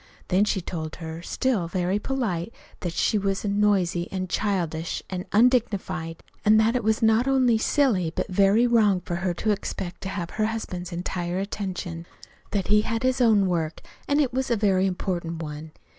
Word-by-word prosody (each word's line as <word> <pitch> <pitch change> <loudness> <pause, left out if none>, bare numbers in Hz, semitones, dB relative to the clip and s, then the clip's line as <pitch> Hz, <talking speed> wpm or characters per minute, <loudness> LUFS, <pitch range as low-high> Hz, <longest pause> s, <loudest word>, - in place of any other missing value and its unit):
Then 190 +3 +3
she 195 -2 0
told 160 -3 -5
her, 160 -1 -7
still 215 -2 0
very 185 +3 0
polite, 220 -8 -2 0.3
that 175 - -3
she 210 - +1
was 195 +1 -1
noisy 200 -4 +1
an' 185 -1 -3
childish, 170 -6 -1
an' 185 0 -4
undignified, 200 -8 +1 0.2
an' 215 +1 +6
that 220 +2 +3
it 250 - 0
was 220 +1 +1
not 220 +3 +4
only 255 -4 +3
silly, 220 - +2
but - - -1
very 200 +4 +4
wrong 215 -6 +3
for 175 - -3
her 175 0 -1
to 215 +4 0
expect 190 -3 -4
to 190 - -4
have 175 -3 -4
her 215 - 0
husband's 185 -5 -5
entire 175 0 -3
attention; 185 -4 -4 0.4
that 200 -3 -2
he 210 0 +5
had 225 +2 -2
his 255 0 +1
own 215 -5 +5
work, 165 -3 -1 0.3
an' 285 +1 +2
it 270 -5 +1
was 260 0 -1
a 235 - +3
very 195 -3 +2
important 175 -3 -3
one. 150 +1 -7
195 Hz, 180 wpm, -25 LUFS, 175-220 Hz, 0.4 s, an